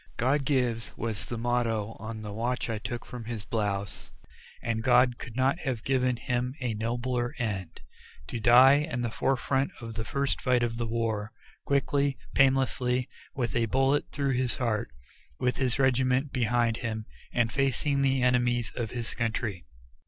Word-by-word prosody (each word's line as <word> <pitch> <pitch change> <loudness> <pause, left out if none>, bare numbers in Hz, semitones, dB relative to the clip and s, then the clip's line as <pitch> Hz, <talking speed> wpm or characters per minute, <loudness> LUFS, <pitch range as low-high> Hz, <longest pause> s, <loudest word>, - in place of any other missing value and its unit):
"God 135 +3 +2
gives," 125 -5 0
was 110 -4 -3
the 120 - -4
motto 115 -2 0
on 110 0 -6
the 105 -1 -6
watch 120 +2 -1
I 110 - -2
took 120 +3 -5
from 120 -2 -8
his 110 -4 -5
blouse, 100 -2 -2 0.5
and 115 -1 -1
God 125 0 +4
could 120 - -8
not 130 +5 +2
have 130 -8 -3
given 130 -2 +1
him 125 +2 -2
a 125 -4 -1
nobler 120 +4 -2
end; 100 -8 -3 0.4
to 120 - -5
die, 125 +4 +7
in 150 -5 -2
the 120 -2 -1
fore 135 +3 +1
front 135 +2 0
of 115 -1 -7
the 115 0 -3
first 140 +4 -1
fight 125 -2 +2
of 115 -1 -1
the 120 -1 -2
war, 110 -2 -1 0.3
quickly, 140 0 +1 0.2
painlessly, 130 -2 +2 0.3
with 120 -4 -2
a 115 -1 +2
bullet 135 +4 +2
through 140 -2 0
the - - -3
heart, 115 - -1 0.5
with 125 0 +1
his 130 -3 +1
regiment 130 +1 +2
behind 120 -2 +2
him, 110 -3 -4 0.3
and 120 -2 +1
facing 140 +1 +1
the 135 -2 +2
enemies 120 -1 +2
of 115 -3 -2
his 120 0 -4
country. 110 -6 -2
120 Hz, 165 wpm, -28 LUFS, 115-130 Hz, 0.5 s, die